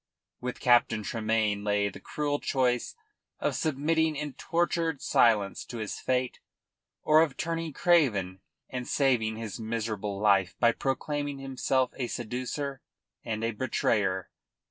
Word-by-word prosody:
With 125 0 -5
Captain 120 -3 +4
Tremayne 110 -2 0
lay 105 -1 +1
the - - -7
cruel 145 -1 -2
choice 125 -3 0 0.4
of - - 0
submitting 160 +2 +1
in 150 -1 -4
tortured 165 0 0
silence 105 -5 +3
to 120 - -7
his 110 -2 -4
fate, 125 -1 -1 0.6
or 155 +1 +6
of 155 -5 0
turning 165 -1 -2
craven 110 - +2 0.3
and 125 -1 -5
saving 120 -6 +2
his 110 -2 -6
miserable 110 -3 -3
life 100 -3 +3
by 115 - +5
proclaiming 145 +3 -2
himself 130 -1 0
a 125 - -2
seducer 130 +4 -4 0.4
and 110 -1 -3
a 115 - +1
betrayer. 105 -5 0
125 Hz, 130 wpm, -29 LUFS, 110-145 Hz, 0.6 s, or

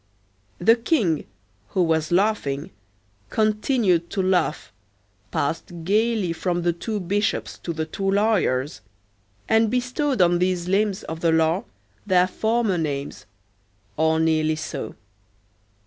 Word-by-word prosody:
The 225 - +5
king, 230 - 0 0.4
who 185 - +1
was 160 -1 0
laughing, 175 -8 0 0.6
continued 215 -5 +1
to 195 - -1
laugh, 180 -4 0 0.6
passed 165 +3 -3
gayly 210 -1 +1
from 175 +1 -2
the 175 0 +2
two 210 +5 -4
bishops 200 +3 -1
to 170 - -4
the 160 -1 -3
two 195 +5 -3
lawyers, 195 - +1 0.7
and 220 0 +3
bestowed 250 +2 -1
on 175 -1 +4
these 180 -1 0
limbs 200 +1 +1
of 160 0 -6
the 165 -1 +2
law 160 +5 +2 0.4
their 185 -3 +4
former 220 0 0
names, 145 -3 -4 0.7
or 160 +1 +2
nearly 155 -1 +2
so. 155 -7 -6
180 Hz, 120 wpm, -23 LUFS, 160-215 Hz, 0.7 s, The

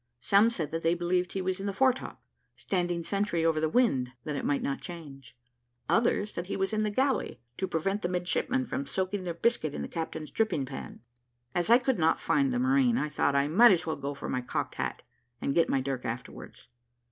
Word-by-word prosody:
Some 200 - +4
said 165 -10 -3
that 165 0 -2
they 165 +1 +2
believed 175 +1 0
he 190 - -2
was 185 +1 -1
in 195 - -3
the 200 - -2
foretop, 260 +4 0 0.3
standing 175 -2 -1
sentry 195 -3 0
over 160 -1 +2
the 155 0 +1
wind, 135 - +2
that 150 - -3
it - - -3
might 145 - 0
not 140 - -2
change; 140 -8 -10 0.5
others, 225 -2 +2
that 175 +1 -5
he - - -3
was 195 +2 -1
in 215 - +1
the 215 - +1
galley, 260 +2 0 0.2
to 190 - -1
prevent 195 +6 -1
the 175 - 0
midshipmen 185 +9 0
from 270 +3 -4
soaking 190 0 -2
their 170 -2 -3
biscuit 170 -7 0
in - - -3
the - - -4
captain's 160 -2 -5
dripping 180 -11 0
pan. 130 - -8 0.5
As 175 +3 0
I 235 - +8
could 255 -4 0
not 160 0 +3
find 275 -2 +2
the 250 - 0
marine, 255 -1 +3
I 150 - -1
thought 145 -1 +1
I 140 +1 +3
might 215 +10 +7
as 175 -1 -1
well 160 - -1
go 140 +1 -5
for - - -6
my 130 - -1
cocked 125 - -3
hat, - - -4 0.4
and 140 - -1
get 165 - +3
my 135 - +2
dirk 130 -1 -3
afterwards. 120 +2 -7
180 Hz, 220 wpm, -29 LUFS, 155-215 Hz, 0.5 s, I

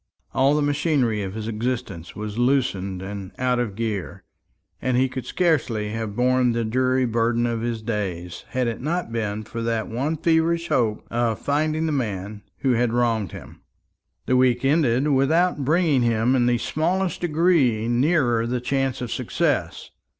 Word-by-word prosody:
All 135 +2 +3
the 150 - +1
machinery 145 -7 +1
of 95 0 -5
his 110 -1 -4
existence 115 -6 -4
was 105 +1 -5
loosened 100 -8 0
and 100 -1 -6
out 125 -1 +1
of 110 -5 -2
gear, 110 -4 -4 0.6
and 130 -1 +1
he 130 +1 +3
could 130 -1 -6
scarcely 130 -12 0
have 110 -1 -4
borne 125 0 +2
the 115 -1 -1
dreary 130 +3 +1
burden 115 0 +1
of 115 -1 -1
his 115 -2 -3
days, 90 -6 -4
had 125 -1 -1
it 115 0 -3
not 165 -1 -2
been 110 -2 -2
for 115 +2 -6
that 115 -1 -1
one 140 +8 -1
feverish 165 +1 +1
hope 110 -4 0
of 115 -2 0
finding 155 +2 0
the 160 - 0
man 105 -6 -3 0.2
who 135 - +2
had 120 -1 +2
wronged 115 -4 0
him. - - -11 0.6
The 130 - +2
week 125 0 +3
ended 135 -2 +2
without 150 +3 +2
bringing 155 -2 +2
him 120 +2 +2
in 120 -2 +2
the 120 -1 +3
smallest 175 +7 -1
degree 155 -9 +2
nearer 120 -2 +2
the 125 +1 -1
chance 135 +1 -1
of 120 -2 -4
success. - - -1
120 Hz, 165 wpm, -23 LUFS, 110-140 Hz, 0.6 s, All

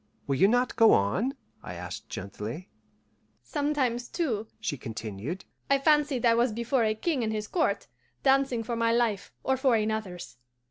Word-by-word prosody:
"Will 135 -1 0
you 195 - +6
not 245 +3 +2
go 225 -1 +7
on?" 185 - +1 0.3
I 90 - -7
asked 90 +1 -7
gently. 105 - -6 0.7
"Sometimes, 275 -5 -1
too," 230 - -2
she 220 -9 -2
continued, 115 - -6 0.2
"I 275 - +5
fancied 290 -3 +2
I 230 - +6
was 235 +1 +3
before 235 +3 0
a 215 0 +1
king 270 +2 -1
and 220 - 0
his 215 -1 -3
court, 335 - 0 0.4
dancing 270 -3 +3
for 235 +1 -3
my 230 0 +2
life 230 -4 +1
or 265 0 +1
for 260 -2 +3
another's. 215 - -2
230 Hz, 160 wpm, -28 LUFS, 185-260 Hz, 0.7 s, go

